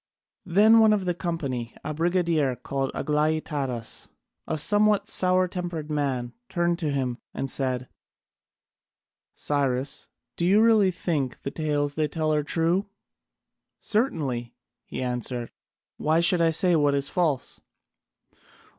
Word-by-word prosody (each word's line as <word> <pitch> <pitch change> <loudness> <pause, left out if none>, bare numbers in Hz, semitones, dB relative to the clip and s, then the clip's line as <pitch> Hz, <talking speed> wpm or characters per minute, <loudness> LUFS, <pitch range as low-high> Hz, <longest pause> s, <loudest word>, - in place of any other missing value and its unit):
Then 215 +6 +6
one 220 -1 +6
of 200 -3 0
the 180 - +1
company, 140 -10 -4
a 155 - -3
brigadier 165 -4 +1
called 135 +2 -3
Aglaïtadas, 150 -5 -1 0.4
a - - -1
somewhat 205 +4 +3
sour 185 -3 +2
tempered 175 -4 -5
man, 135 -5 -1 0.2
turned 175 -1 0
to 160 -4 -1
him 130 -3 -2 0.2
and 135 -1 -3
said: 130 -2 -2 1.5
"Cyrus, 140 -2 -1 0.3
do - - -2
you 190 +4 +5
really 220 -3 +5
think 160 -8 -2
the 135 - -3
tales 145 -2 -1
they 155 0 0
tell 155 0 -1
are 150 - +2
true?" 165 +6 0 0.9
"Certainly," 140 - -1 0.3
he - - -5
answered, 125 -1 -3 0.5
"why 160 +2 +2
should 170 +1 +3
they 165 -1 +4
say 175 +2 +3
what 145 -2 +3
is 140 0 0
false?" 155 -7 -1
155 Hz, 130 wpm, -26 LUFS, 135-180 Hz, 1.5 s, Then